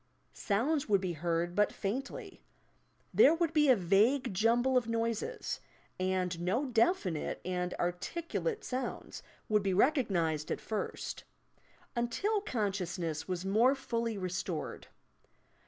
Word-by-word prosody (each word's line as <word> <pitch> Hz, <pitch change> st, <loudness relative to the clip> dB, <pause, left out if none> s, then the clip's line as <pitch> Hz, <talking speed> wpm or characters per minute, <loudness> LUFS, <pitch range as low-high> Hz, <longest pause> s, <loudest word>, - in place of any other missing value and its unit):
Sounds 265 Hz, +7 st, 0 dB
would 200 Hz, -2 st, +5 dB
be 185 Hz, -2 st, -2 dB
heard 170 Hz, +2 st, -1 dB
but 210 Hz, +2 st, +3 dB
faintly. 275 Hz, -, -5 dB, 0.7 s
There 310 Hz, -, +7 dB
would 330 Hz, -1 st, 0 dB
be 300 Hz, -3 st, +4 dB
a 255 Hz, -, +8 dB
vague 210 Hz, +6 st, +3 dB
jumble 235 Hz, +6 st, +3 dB
of 245 Hz, -2 st, +3 dB
noises, 230 Hz, -, -2 dB, 0.4 s
and 185 Hz, -2 st, 0 dB
no 205 Hz, +11 st, +1 dB
definite 230 Hz, -, +1 dB
and 180 Hz, 0 st, -2 dB
articulate 335 Hz, -, -2 dB
sounds 255 Hz, +1 st, -4 dB, 0.3 s
would 210 Hz, -1 st, +3 dB
be 195 Hz, -2 st, 0 dB
recognized 185 Hz, -, +2 dB
at -, -, -1 dB
first, 215 Hz, -1 st, -4 dB, 0.4 s
— -, -, -36 dB, 0.3 s
until 390 Hz, -, 0 dB
consciousness 185 Hz, -, -2 dB
was 180 Hz, 0 st, -3 dB
more 230 Hz, +8 st, +4 dB
fully 230 Hz, -4 st, -2 dB
reatored. 185 Hz, -3 st, -4 dB
215 Hz, 120 wpm, -32 LUFS, 180-265 Hz, 0.7 s, a